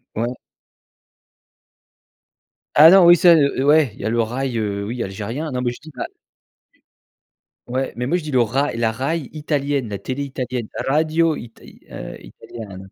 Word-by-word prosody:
ouais. 120 +3 -1 2.4
Ah, 155 +3 +10
non, 190 -1 +7
oui, 175 - +9
ça, 175 0 +6
heu, 140 -3 +2
ouais, 145 -2 +4
il - - -13
y - - -7
a 110 - 0
le 115 +1 +1
raï, 125 +2 -2
heu, 100 -2 -2
oui, 115 +4 -4
algérien. 110 +11 -4
Non, 125 -1 -2
mais 120 -1 0
je - - -11
dis 155 +1 -13
la - - -4 1.6
ouais, 130 +2 -2
mais 125 - -3
moi, 170 +8 +1
je 175 - -6
dis 155 - -6
le 130 -2 +3
rai, 130 +3 0
la 115 -1 +1
Rai 140 +5 -3
italienne, 145 -4 -2
la 100 - -4
télé 130 +7 -5
italienne, 125 -4 -4 0.2
radio 160 +3 +2
ita, 115 -4 -11
heu, - - -10
italiana, 105 -5 -10
130 Hz, 170 wpm, -20 LUFS, 115-150 Hz, 2.4 s, Ah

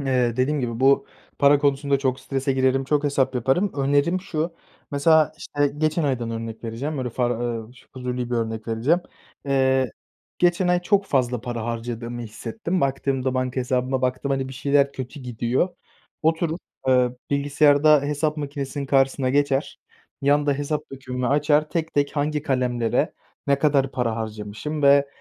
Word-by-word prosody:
eee, 125 -3 +1
dediğim 140 +3 +1
gibi 120 -1 -3
bu 135 +1 +4 0.3
para 140 0 +6
konusunda 140 -1 +1
çok 130 -1 -1
strese 135 0 -1
girerim, 130 0 +2
çok 150 +1 +1
hesap 135 -2 +1
yaparım. 135 - +1
Önerim 145 +6 +2
şu, 165 -3 -3 0.4
mesela, 155 +1 +4
işte, 145 -1 -1
geçen 155 +1 +1
aydan 125 -5 -1
örnek 115 0 -6
vereceğim, 135 +6 -4
öyle 125 -2 -2
far 120 -1 -1
eee, 120 - -17
ş 130 - -19
fuzuli 125 -1 -4
bir 120 - 0
örnek 110 -1 -3
vereceğim. 125 +10 +2 0.5
Eee, 130 -2 +2 0.5
geçen 180 +1 +2
ay 180 0 +2
çok 200 +2 +2
fazla 125 - +1
para 120 -2 -4
harcadığımı 120 0 -4
hissettim. 170 - -4
Baktığımda, 135 -1 0
banka 130 0 -1
hesabıma 130 +1 -1
baktım, 130 +2 -1
hani, 135 -1 -1
bir - - -8
şeyler 140 +1 +2
kötü 130 +2 -7
gidiyor. 120 +5 0 0.5
Oturup, 160 +1 +1 0.3
eee, 125 -1 +4 0.2
bilgisayarda 145 +1 +4
hesap 150 +2 -1
makinesinin 140 -1 -4
karşısına 135 -1 +2
geçer, 140 0 0 0.4
yanda 145 +1 +3
hesap 145 +2 -2
dökümümü 125 -2 -4
açar, 150 +2 +2
tek 165 -1 -2
tek 145 +1 0
hangi 150 +1 0
kalemlere 125 -4 0 0.3
ne 140 0 +3
kadar 140 -3 +2
para 115 -3 -1
harcamışım 110 +7 -5
ve, 140 0 +6
135 Hz, 155 wpm, -23 LUFS, 125-145 Hz, 0.5 s, para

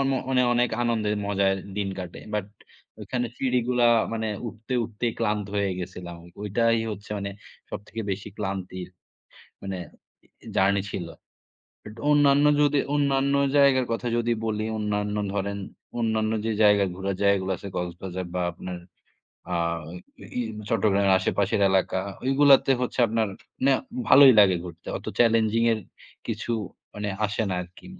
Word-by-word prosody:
ম - - +1 0.2
মানে 130 -1 +3
অনেক 120 0 +2
আনন্দের 110 -3 0
মজায় 100 -1 +2 0.2
দিন 100 -1 -1
কাটে। 90 -2 -7 0.2
বাট 105 -2 -1 0.5
ওখানে 125 -1 -2
সিঁড়িগুলা 125 -2 +1 0.3
মানে 110 -1 -2 0.2
উঠতে, 115 +2 -7
উঠতেই 115 +1 -3
ক্লান্ত 105 -2 0
হয়ে 100 -1 +1
গেছিলাম। 90 -1 -7 0.3
ওইটাই 115 +3 +2
হচ্ছে 105 0 -8
মানে 100 0 -4 0.4
সবথেকে 105 +3 -6
বেশি 100 +2 -4
ক্লান্তির 95 -3 -4 0.7
মানে 95 -1 -4 0.7
এ - - -13
জার্নি 100 +1 +3
ছিল। 85 -3 -4 0.8
বাট 105 - -10 0.2
অন্যান্য 145 -1 +5 0.2
যদি, 145 0 +3 0.2
অন্যান্য 140 -1 +2 0.2
জায়গার 135 -3 +5
কথা 115 +1 -3
যদি 120 0 +1
বলি 110 -1 -1
অন্যান্য 105 0 -1 0.2
ধরেন, 100 0 -2 0.4
অন্যান্য 110 -1 0
যে, 115 - 0
জায়গা 105 -1 +5
ঘুরার 95 0 -3
জায়গাগুলো 100 -1 +2
আছে 100 - -8
কক্সবাজার 90 +1 -4
বা 90 - 0
আপনার 90 +1 -7 0.7
আ - - +1 0.8
ই - - +2 0.3
চট্টগ্রামের 100 -3 +3
আশেপাশের 100 +1 0
এলাকা। 95 0 +1 0.3
ঐগুলাতে 135 0 +5
হচ্ছে 125 - -3
আপনার 110 0 0 0.4
নে 140 - +5 0.4
ভালোই 135 0 +9
লাগে 95 -3 +5
ঘুরতে। 85 -1 -11
অত - - -15
চ্যালেঞ্জিং 115 -1 +3
এর 110 - -1 0.5
কিছু 115 +1 -3 0.4
মানে 105 0 -3 0.2
আসে 105 +2 -2
না - - 0
আরকি 90 +1 -15
105 Hz, 140 wpm, -25 LUFS, 95-120 Hz, 0.8 s, ভালোই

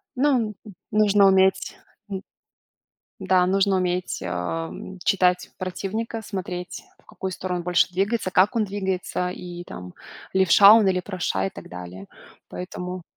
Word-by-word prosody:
Ну, 250 -5 +2 0.4
нужно 205 -1 +5
уметь, 190 0 +3 0.3
м, 190 -2 -4 1.0
да, 185 -1 +3
нужно 195 +1 +2
уметь, 180 0 -1
ам, 90 - -4
читать 180 -2 +2
противника, 215 +5 -4
смотреть 180 -4 -6 0.2
в - - -34
какую 190 - -5
сторону 180 -1 -3
больше 175 0 +3
двигается, 195 +2 0
как 190 +4 +3
он 220 - +2
двигается, 190 -2 -2
и 175 -1 -8
там 90 - -9 0.4
левша 190 +2 +7
он 220 -2 +6
или 185 -1 +1
правша, 175 - -2
и - - -3
так 85 - -11
далее. 90 +2 -9 0.4
Поэтому 180 0 -6
185 Hz, 130 wpm, -24 LUFS, 175-200 Hz, 1.0 s, левша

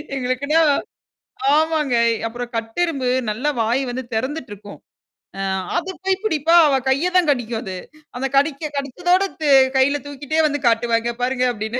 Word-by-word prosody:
எங்களுக்குன்னா 270 +5 0 1.0
ஆமாங்க. 310 -4 +1 0.3
அப்புறம் 240 +1 -7
கட்டெறும்பு 260 +4 -1 0.2
நல்ல 230 +7 -3 0.2
வாய் 240 +5 +1
வந்து 255 +2 -4
திறந்துட்டுருக்கும். 220 -5 -5 0.6
அ - - -2 0.4
அத 345 +2 -2 0.2
போய் 385 0 0
பிடிப்பா 330 -4 +2
அவ 275 - +2
கைய 280 +7 +1
தான் 340 -5 +3
கடிக்கும் 235 -3 -2
அது. 190 -2 -6 0.4
அந்த 270 - -1
கடிக்க 295 +1 0
கடிச்சதோட 355 +8 +1 0.2
த 310 - -1 0.3
கையில 280 +2 +3
தூக்கிட்டே 285 +2 -3
வந்து 290 -1 -2
காட்டுவாங்க 230 0 +1
பாருங்க 255 0 0
அப்பிடின்னு. 220 +3 -4
270 Hz, 135 wpm, -20 LUFS, 240-310 Hz, 1.0 s, தான்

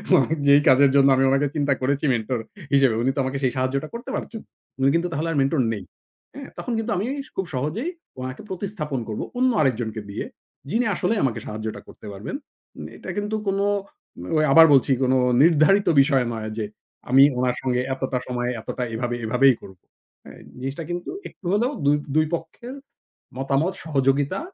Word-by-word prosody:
মানে 135 +4 +3
যেই 140 +1 +7
কাজের 140 +1 +6
জন্য 140 0 +6
আমি 135 - +2
ওনাকে 140 +2 +2
চিন্তা 145 -2 +2
করেছি 140 +3 0
মেন্টর 115 +1 -2 0.3
হিসেবে। 135 -5 +4
উনি 130 - +2
তো - - -2
আমাকে 130 +1 -2
সেই 125 - +2
সাহায্যটা 130 +3 -1
করতে 240 +3 -7
পারছেন 225 -2 -5
না। - - -51 0.3
উনি 135 - +4
কিন্তু 170 +1 +1
তাহলে 155 +3 -2
আর 150 - -2
মেন্টর 135 +1 +2
নেই। 100 - -6 0.5
হ্যাঁ 275 0 -9
তখন 245 - -5
কিন্তু 225 +1 -2
আমি 195 - -1 0.3
খুব 190 - -2
সহজেই 155 - -2 0.3
ওনাকে 130 0 -6
প্রতিস্থাপন 175 - -4
করব 105 - -4 0.2
অন্য 255 0 +3
আরেকজনকে 115 -5 -1
দিয়ে। 100 - -4 0.4
যিনি 230 +7 +1
আসলে 190 +5 0
আমাকে 130 -4 0
সাহায্যটা 110 +1 -5
করতে - - -14
পারবেন। 100 - -6 0.6
এটা - - -9
কিন্তু 210 +1 -2
কোন 195 0 0 0.9
আবার 165 +2 +9
বলছি 135 0 +4
কোন 130 0 +2 0.3
নির্ধারিত 175 +5 +4
বিষয় 135 -3 +2
নয় 110 -1 -5
যে 110 - -1 0.4
আমি 135 +2 +7
উনার 125 0 +1
সঙ্গে 125 -1 0
এতটা 130 -1 -2
সময় 125 -1 -2
এতটা 125 - -4
এভাবে, 120 +1 -2
এভাবেই 125 +3 +4
করব। 95 -2 -13 0.8
জিনিসটা 135 +5 -4
কিন্তু 175 0 -4 0.2
একটু 185 - -21
হলেও 240 +6 +1
২ 145 +1 +5 0.2
২ 155 - +4
পক্ষের 235 +11 -9 0.6
মতামত 140 +7 0
সহযোগিতা 140 -2 +1
140 Hz, 170 wpm, -23 LUFS, 125-170 Hz, 0.9 s, আবার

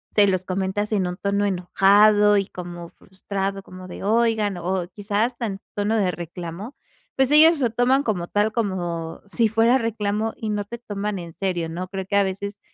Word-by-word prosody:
se 205 - +6
los 185 -1 0
comentas 190 +3 -2
en 195 -3 +1
un 180 0 -5
tono 200 +1 0
enojado, 205 +3 +4
y 195 -1 0
como 175 -2 -8
frustrado, 195 +1 -5
como 185 -1 -11
de: - - -9
"Oigan", 220 -2 +1
o 180 +1 -2
quizás 210 +4 -1
tan 210 -5 -4 0.2
tono 205 +2 0
de 195 -4 +2
reclamo, 175 - -7 0.4
pues, 265 -1 +2
ellos 315 +1 +7
lo 245 -4 +2
toman 245 +4 +2
como 200 -9 -1
tal, 205 +3 +1
como 175 -7 -3
si 225 +3 +1
fuera 225 +3 +4
reclamo 220 -2 -2
y 220 - -4
no 205 -1 -2
te 235 +3 -8
toman 205 -3 -4
en 170 -1 -9
serio, 175 -4 -2
¿no? 175 +3 -5
Creo 190 0 -5
que 200 - -2
a 200 - +5
veces, 200 +2 -4
200 Hz, 190 wpm, -23 LUFS, 185-220 Hz, 0.4 s, ellos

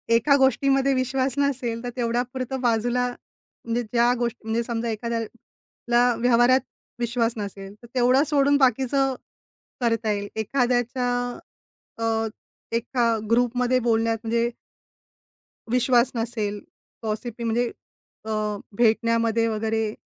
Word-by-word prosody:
एका 280 +5 +4
गोष्टीमध्ये 270 0 +3
विश्वास 260 0 0
नसेल, 250 -5 -1
तर 245 - -3
तेवढ्यापुरतं 250 +2 -2
बाजूला 245 +1 +1
म्हणजे 240 -1 -7
ज्या 235 +2 +2
गोष्टी 240 0 -2
म्हणजे 225 +1 0
समजा, 235 0 -2
एखाद्याला 235 +2 -2
व्यवहारात 245 +2 +4 0.4
विश्वास 235 -1 0
नसेल, 200 -1 -6
तर - - -11
तेवढं 255 +2 +4
सोडून 285 0 +3
बाकीचं 265 +1 +2 0.7
करता 230 -2 +1
येईल. 205 0 -2
एखाद्याच्या 245 +2 0 0.9
अ, 225 0 +1 0.5
एका 240 +1 0 0.2
ग्रुपमध्ये 245 +2 +2
बोलण्यात 225 -1 +1
म्हणजे 230 +1 +1 1.2
विश्वास 250 0 +3
नसेल. 220 -3 -2 0.4
पॉसिब्ली 225 +2 -4
म्हणजे? 235 +1 0 0.5
अ, 220 - -6 0.5
भेटण्यामध्ये 230 0 +2
वगैरे 220 0 -1
235 Hz, 105 wpm, -24 LUFS, 225-250 Hz, 1.2 s, एका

